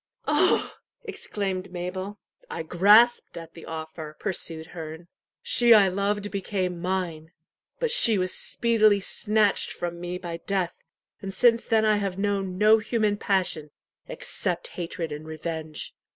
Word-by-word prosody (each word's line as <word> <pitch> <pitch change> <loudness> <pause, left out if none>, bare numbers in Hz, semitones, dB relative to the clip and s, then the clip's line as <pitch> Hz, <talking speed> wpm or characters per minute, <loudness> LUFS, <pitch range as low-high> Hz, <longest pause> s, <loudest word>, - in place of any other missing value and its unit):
"Oh!" - - +2 0.3
exclaimed 190 -2 -4
Mabel. 185 +3 -5 0.3
"I - - -4
grasped 205 +9 +4
at 165 -1 -9
the 165 - -12
offer," 160 -1 -7
pursued 165 -4 -2
Herne. 160 0 -8 0.3
"She 240 -1 +5
I 200 -3 +6
loved 200 +2 -2
became 185 -3 -3
mine. 175 -4 -3 0.5
But 480 -2 0
she 235 - +4
was 185 0 0
speedily 215 -3 +3
snatched 210 +1 +1
from 170 0 -5
me 175 +1 -4
by 175 -2 -6
death, 185 0 -2 0.4
and 195 - -5
since 230 +4 +3
then 220 -1 +3
I 215 -1 +3
have 195 -2 -3
known 195 -2 -1
no 215 +2 +5
human 215 -1 0
passion 185 -7 -1 0.4
except - - -3
hatred 165 -2 -5
and 150 +1 -7
revenge. 160 0 -5
185 Hz, 135 wpm, -26 LUFS, 170-205 Hz, 0.5 s, I